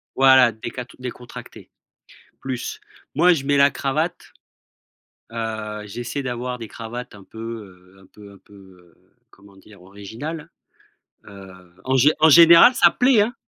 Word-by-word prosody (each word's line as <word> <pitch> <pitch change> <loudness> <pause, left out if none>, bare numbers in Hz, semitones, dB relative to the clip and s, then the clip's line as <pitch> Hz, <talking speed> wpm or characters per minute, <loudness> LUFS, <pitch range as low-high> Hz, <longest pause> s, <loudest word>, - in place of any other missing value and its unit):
Voilà 130 -3 +5
décat 120 +3 -8
décontracté, 125 -1 -11 0.7
plus. 130 -2 -6 0.4
Moi 175 +3 +4
je 135 -4 -4
mets 145 0 +1
la 140 0 +4
cravate, 155 +6 -4 1.0
heu, 110 -2 -6
j'essaie 120 +6 -6
d'avoir 125 0 -5
des 115 -2 -9
cravates 120 +2 -9
un 100 - -15
peu, 110 - -15
heu, 95 -5 -10
un 95 - -20
peu 100 -1 -16
un 100 - -18
peu, 105 - -23
heu, 90 -3 -19 0.3
comment 100 0 -21
dire? 100 -1 -18
Originales, 115 - -9 0.8
heu, 100 -2 -13 0.3
en 130 +1 0
gé 145 +4 +4
en 160 - +6
général, 170 - +7
ça - - +5
plaît, 250 -4 +3
hein. 240 +4 -5
120 Hz, 145 wpm, -21 LUFS, 100-140 Hz, 1.0 s, général